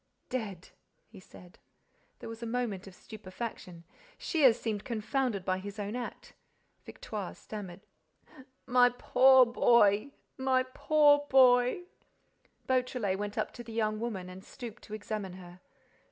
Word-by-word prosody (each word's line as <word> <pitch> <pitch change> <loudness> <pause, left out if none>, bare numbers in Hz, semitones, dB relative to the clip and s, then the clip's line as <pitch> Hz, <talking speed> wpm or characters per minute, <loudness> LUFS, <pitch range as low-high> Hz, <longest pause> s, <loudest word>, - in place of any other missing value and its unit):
"Dead—" 205 -8 -5 0.4
he 215 -3 -13
said. 180 -1 -16 0.6
There - - -7
was 225 0 -9
a 235 - -4
moment 225 -5 -3
of 190 - -12
stupefaction. 190 -5 -8 0.3
Shears 265 -8 +3
seemed 215 -3 -3
confounded 230 -3 -2
by 185 0 0
his 200 +2 -8
own 205 +2 -4
act. 245 -1 -7 0.5
Victoire 205 -4 -7
stammered: 195 -4 -9 0.8
"My 245 0 +5
poor 255 +1 +5
boy—my 240 +3 +2
poor 295 -2 +4
boy—" 250 +5 +5 0.8
Beautrelet 250 -6 0
went 205 0 -5
up - - -2
to 240 - -9
the 230 -1 -10
young 215 -1 -1
woman 215 -6 -4
and 185 +1 -11
stooped 240 -1 -10
to 215 - -7
examine 210 -3 -5
her. 180 -1 -12
220 Hz, 130 wpm, -30 LUFS, 200-250 Hz, 0.8 s, My